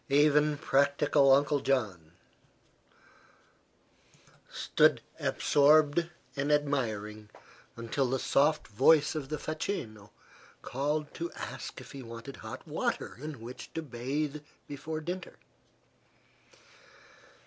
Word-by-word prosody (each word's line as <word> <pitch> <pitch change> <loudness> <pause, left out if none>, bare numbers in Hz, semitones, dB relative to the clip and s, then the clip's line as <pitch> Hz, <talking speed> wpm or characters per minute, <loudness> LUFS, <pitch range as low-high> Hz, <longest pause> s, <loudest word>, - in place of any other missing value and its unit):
Even 150 +1 +4
practical 140 0 +3
Uncle 145 +2 +4
John 100 -13 -1 2.4
stood - - +3 0.2
absorbed 150 +3 +3 0.3
and 140 +1 -1
admiring 110 -8 -1 0.5
until 120 +3 -1
the 135 - +1
soft 150 +4 +2
voice 145 +7 +4
of 150 -4 -5
the 155 - -2
facchino 120 - -4 0.5
called 150 +3 -2
to 170 +1 -4
ask - - -7
if - - -12
he 135 - -8
wanted 115 +2 -9
hot - - -9
water - - -2
in 150 -5 -7
which 120 +2 -9
to 165 - -2
bathe 140 +3 -3 0.3
before 155 +2 -5
dinner. 175 +3 -5
140 Hz, 100 wpm, -30 LUFS, 125-150 Hz, 2.4 s, Even